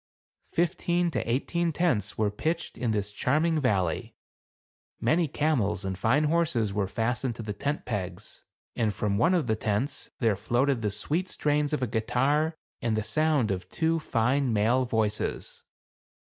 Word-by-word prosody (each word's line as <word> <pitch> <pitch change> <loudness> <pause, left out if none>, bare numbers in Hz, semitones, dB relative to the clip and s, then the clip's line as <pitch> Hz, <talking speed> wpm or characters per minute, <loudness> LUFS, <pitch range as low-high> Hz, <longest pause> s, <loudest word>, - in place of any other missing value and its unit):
Fifteen 175 +1 +1
to 125 - -1
eighteen 170 +7 0
tents 145 - 0
were 105 -2 +1
pitched 160 +10 -2
in 125 - -2
this 105 -1 -1
charming 155 +9 +1
valley; 95 - 0 0.8
many 165 +1 +2
camels 115 - 0
and 95 0 -2
fine 115 +11 +2
horses 150 -10 +1
were 100 -1 0
fastened 120 +4 -1
to 115 - -6
the 105 -1 -4
tent 145 +8 -3
pegs, 95 -2 -5 0.3
and 110 -3 0
from 100 -1 0
one 175 +3 +4
of 170 - +1
the 110 -2 +1
tents 110 +6 -2
there 115 -4 +2
floated 120 +5 +1
the 105 - 0
sweet 155 - -2
strains 150 0 0
of 150 -4 0
a - - +3
guitar, 135 +8 +1 0.3
and 115 -2 0
the 110 - 0
sound 140 0 +1
of 90 -1 -4
two 165 +6 +1
fine 130 -1 +1
male 115 +5 +2
voices. 110 -3 -2
125 Hz, 160 wpm, -28 LUFS, 105-155 Hz, 0.8 s, one